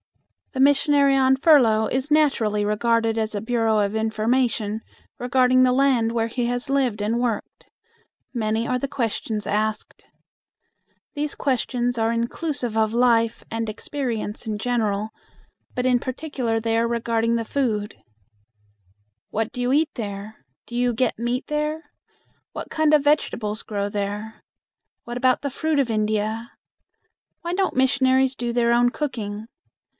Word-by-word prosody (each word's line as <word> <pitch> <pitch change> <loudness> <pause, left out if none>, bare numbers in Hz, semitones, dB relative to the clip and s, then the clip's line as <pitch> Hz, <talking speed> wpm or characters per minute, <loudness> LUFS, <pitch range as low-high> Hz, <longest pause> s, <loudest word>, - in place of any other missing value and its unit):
The 260 - -4
missionary 280 0 +4
on 265 0 +4
furlough 245 -8 +5
is 260 +5 -2
naturally 225 -9 +2
regarded 225 +1 +1
as 220 -1 -1
a - - -1
bureau 225 0 +1
of 205 0 0
information 220 0 0 0.4
regarding 255 +1 +3
the 255 - +4
land 255 -3 +3
where 230 -1 0
he 235 +1 -2
has 245 +2 -2
lived 255 -7 +1
and 225 +3 0
worked. 230 -4 -3 0.7
Many 225 -1 -1
are 250 - 0
the 275 - -2
questions 225 -5 -3
asked. 215 +1 -2 1.1
These 295 0 -2
questions 245 -2 -1
are 225 0 +1
inclusive 240 +1 -2
of 220 0 +1
life 230 -1 +2
and 225 -1 -3
experience 230 -2 -4
in 215 -1 -2
general, 215 -2 -1 0.6
but 250 - -2
in 250 -1 +3
particular 255 -3 -2
they 225 0 0
are 230 0 +2
regarding 230 0 0
the 230 -1 -1
food. 220 -6 -1 1.3
"What 220 +1 -2
do 250 - -4
you 245 +1 +1
eat 305 +3 +2
there? 210 -1 -7 0.2
Do 240 - -9
you 245 0 +1
get 235 -1 0
meat 240 +3 -1
there? 300 +2 -3 0.6
What - - -6
kind 310 -1 +2
of 295 -2 +5
vegetables 230 -7 0
grow 200 -2 -2
there? 205 +2 -4 0.6
What 240 - -6
about 255 +1 +2
the 280 - -2
fruit 310 +2 0
of 265 -4 +1
India? 215 +2 -1 0.9
Why 345 +1 -3
don't 380 0 0
missionaries 260 0 +3
do 240 -1 -3
their 235 0 +2
own 240 0 +4
cooking? 220 -6 -4
235 Hz, 145 wpm, -23 LUFS, 220-260 Hz, 1.3 s, furlough